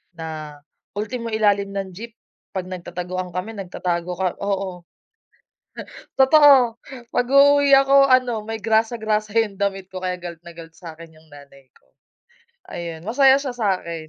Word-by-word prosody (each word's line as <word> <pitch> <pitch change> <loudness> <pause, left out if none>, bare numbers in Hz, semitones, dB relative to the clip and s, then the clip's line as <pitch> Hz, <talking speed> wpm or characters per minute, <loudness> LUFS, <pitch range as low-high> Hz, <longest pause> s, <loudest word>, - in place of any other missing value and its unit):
Na 155 -2 -8 0.4
ultimo 230 +3 -4
ilalim 200 -2 +1
ng 195 -1 -4
jeep 230 +5 -10 0.4
pag 185 -1 -3
nagtataguan 180 0 -6
kami 185 +5 -5
nagtatago 180 -3 -4
ka 190 - 0
oo. 195 -3 -3 1.3
Totoo, 265 -4 +6 0.3
pag-uuwi 280 +3 +4
ako 275 0 +5
ano 250 -4 +2
may 225 -1 -5
grasa, 225 +1 +1
grasa 215 -1 -2
yung 210 -3 0
damit 195 -1 -3
ko 190 - -7
kaya 180 0 -2
galit 170 -2 -9
na 170 - -9
galit 165 -1 -12
sa'kin 165 -2 -12
yung 160 0 -23
nanay 140 -2 -16
ko. - - -28 0.8
Ayun 170 -1 -7
masaya 265 +5 +4
siya 275 -3 -4
sa'kin. 185 -8 -3
195 Hz, 140 wpm, -21 LUFS, 175-230 Hz, 1.3 s, Totoo